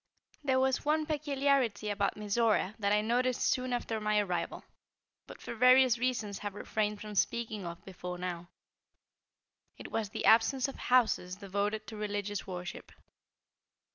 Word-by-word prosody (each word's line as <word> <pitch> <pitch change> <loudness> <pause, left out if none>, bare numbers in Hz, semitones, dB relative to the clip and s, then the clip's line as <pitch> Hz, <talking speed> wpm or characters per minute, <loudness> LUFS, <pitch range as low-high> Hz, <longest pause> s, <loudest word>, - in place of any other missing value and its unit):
There 260 -2 +2
was 265 -1 +1
one 310 +1 +1
peculiarity 275 -8 0
about 200 -1 0
Mizora 210 -1 +1
that 200 -1 +1
I 210 0 +4
noticed 245 +3 +1
soon 255 0 +1
after 230 -2 -2
my 210 0 +1
arrival, 190 -4 -1 0.6
but - - -11
for - - -6
various 250 0 +5
reasons 230 -5 -1
have 205 -1 -5
refrained 210 0 -2
from 210 0 -7
speaking 215 -2 -1
of 170 0 -8
before 180 -1 -6
now. 175 -1 -5 1.3
It - - -9
was 220 -3 -1
the - - -4
absence 235 +4 +5
of 275 - -7
houses 220 -7 +2
devoted 205 +2 -2
to 215 +1 -8
religious 205 -1 -3
worship. 180 0 -7
215 Hz, 145 wpm, -31 LUFS, 200-250 Hz, 1.3 s, various